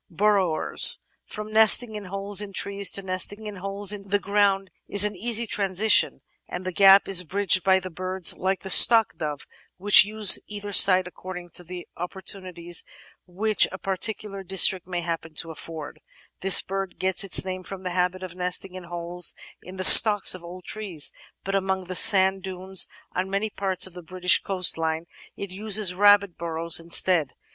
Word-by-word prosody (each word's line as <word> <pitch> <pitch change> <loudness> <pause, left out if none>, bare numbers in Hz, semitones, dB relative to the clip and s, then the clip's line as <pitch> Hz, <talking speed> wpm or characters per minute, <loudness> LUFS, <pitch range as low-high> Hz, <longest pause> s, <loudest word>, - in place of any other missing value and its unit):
Burrowers 190 -3 +1 0.3
From 215 0 -10
nesting 220 +1 +4
in 210 -1 -9
holes 195 +2 -3
in 200 -1 -10
trees 200 -1 -1
to 195 - -2
nesting 190 +3 -5
in 210 -1 -9
holes 195 +1 -3
iQ 200 -1 -8
the 205 - 0
ground 200 -2 -2 0.2
is 205 0 +3
an 210 -1 -5
easy 230 +4 -3
transition, 205 0 0 0.3
and 180 +1 -8
the 185 - -5
gap 195 +1 +4
is 185 -2 +4
bridged 190 +1 0
by 190 -1 +2
birds 185 0 -2
like 190 +1 -4
the 190 - -8
Stock 225 +2 +5
Dove, 150 -2 -7 0.3
which 205 +3 +6
use 210 0 +3
either 205 -1 -9
site 185 -1 +5
according 180 -1 -11
to 175 - -11
the 175 +1 -11
oppor 180 +2 -9
tunities 175 -3 -4 0.4
which 210 +4 +1
a 185 - -9
particular 195 +1 -6
district 190 -1 +2
may 175 -1 -5
happen 165 -2 -7
to 165 +1 -4
afford; 160 -1 -11 0.4
this 195 0 +4
bird 195 -1 -7
gets 190 +1 0
its 190 -1 +3
name 185 0 -7
from 190 +1 -12
the 180 - -6
habit 180 +1 -3
of 185 -2 -9
nesting 180 +1 -5
in 185 -1 -11
holes 175 0 -4 0.3
in 185 +2 -14
the 185 - -5
"stocks" 205 +1 +9
of 185 -2 -12
old 180 +2 -12
trees, 190 -9 -5 0.3
but 195 - -6
among 190 -1 -3
the 185 0 -9
sand 190 +1 +2
dunes 190 0 -2 0.2
on 185 +1 -5
many 200 +2 -4
parts 190 -2 0
of 185 - -5
the 180 - -11
British 180 +1 0
coastline 165 -4 -1 0.3
it 200 -2 -9
uses 205 -1 0
rabbit 200 -1 +1
burrows 165 0 -1
instead. 165 -3 0
190 Hz, 175 wpm, -22 LUFS, 180-200 Hz, 0.4 s, stocks